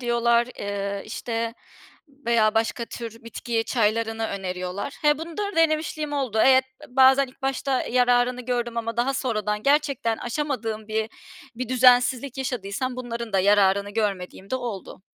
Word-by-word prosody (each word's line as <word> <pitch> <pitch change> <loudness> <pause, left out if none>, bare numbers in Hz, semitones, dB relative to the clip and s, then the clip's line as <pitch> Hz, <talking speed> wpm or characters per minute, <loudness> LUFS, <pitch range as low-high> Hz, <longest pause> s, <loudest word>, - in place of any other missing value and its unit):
diyorlar, 235 -1 +2
eee, 200 0 -3
işte, 230 -1 -3 0.7
veya 220 -2 +3
başka 225 +1 0
tür 230 -1 -8
bitki 230 0 -2
çaylarını 225 -1 0
öneriyorlar. 185 +3 -4
He, 295 0 +4
bunları 340 +4 -4
denemişliğim 310 -2 +1
oldu. 260 -6 -1
Evet 260 0 +6 0.2
b 250 - -20
bazen 265 +1 +6
ilk 255 - -19
başta 270 0 0
yararını 245 0 +2
gördüm 240 -1 -2
ama 230 0 -3
daha 265 +3 +1
sonradan 215 -5 -1
gerçekten 280 -6 +1
aşamadığım 235 -5 -3
bir 220 0 -1 0.5
bir 250 -1 -4
düzensizlik 255 +1 +4
yaşadıysam 250 0 -3
bunların 235 -3 -5
da 195 - +3
yararını 200 0 +3
görmediğim 200 -3 -3
de 260 - +1
oldu. 225 -6 -6
235 Hz, 140 wpm, -24 LUFS, 215-260 Hz, 0.7 s, Evet